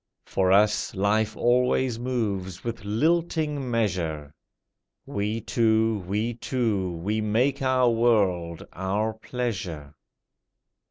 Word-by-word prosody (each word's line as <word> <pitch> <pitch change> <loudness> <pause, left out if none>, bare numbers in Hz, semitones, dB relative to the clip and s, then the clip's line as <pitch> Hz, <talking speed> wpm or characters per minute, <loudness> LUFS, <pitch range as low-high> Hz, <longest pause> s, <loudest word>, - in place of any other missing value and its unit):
For 95 -1 +1
us 105 +2 +3
life 105 +3 +1
always 125 0 +2
moves 105 -8 -2
with 115 -2 -5
lilting 150 +4 0
measure; 85 -10 -1 0.7
We 105 +3 -2
two, 110 -2 +1
we 105 +5 -1
two, 110 -7 -1
we 100 +6 -2
make 120 +7 +1
our 130 -1 +3
world, 100 -8 +1
our 100 +4 -1
pleasure. 95 - -4
110 Hz, 100 wpm, -26 LUFS, 95-120 Hz, 0.7 s, us